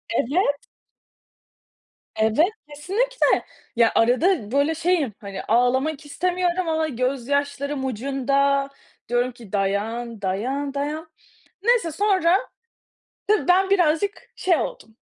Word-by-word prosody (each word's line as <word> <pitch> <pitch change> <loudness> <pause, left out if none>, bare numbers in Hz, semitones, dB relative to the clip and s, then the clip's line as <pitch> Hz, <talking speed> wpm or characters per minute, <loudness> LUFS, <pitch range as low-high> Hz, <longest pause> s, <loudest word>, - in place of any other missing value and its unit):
Evet. 285 - 0 1.5
Evet, 220 +10 +3 0.2
kesinlikle 400 +13 0 0.3
ya, 230 -1 +4
arada 250 - +2
böyle 285 +4 +2
şeyim, 330 -7 +1
hani, 200 -2 -6
ağlamak 260 +6 +1
istemiyorum 355 +3 -1
ama 315 0 +1
gözyaşlarım 280 +2 -1
ucunda 275 +3 0 0.4
diyorum 245 +1 +1
ki 230 -4 -15
dayan, 215 +3 -2
dayan, 255 +9 -2
dayan. 305 +3 -4 0.5
Neyse 460 -7 +3
sonra 375 -1 +3 0.9
tabii 420 -3 +1
ben 380 +2 +4
birazcık 360 +2 +1
şey 360 -2 +2
oldum 225 -7 -5
285 Hz, 100 wpm, -23 LUFS, 245-345 Hz, 1.5 s, ya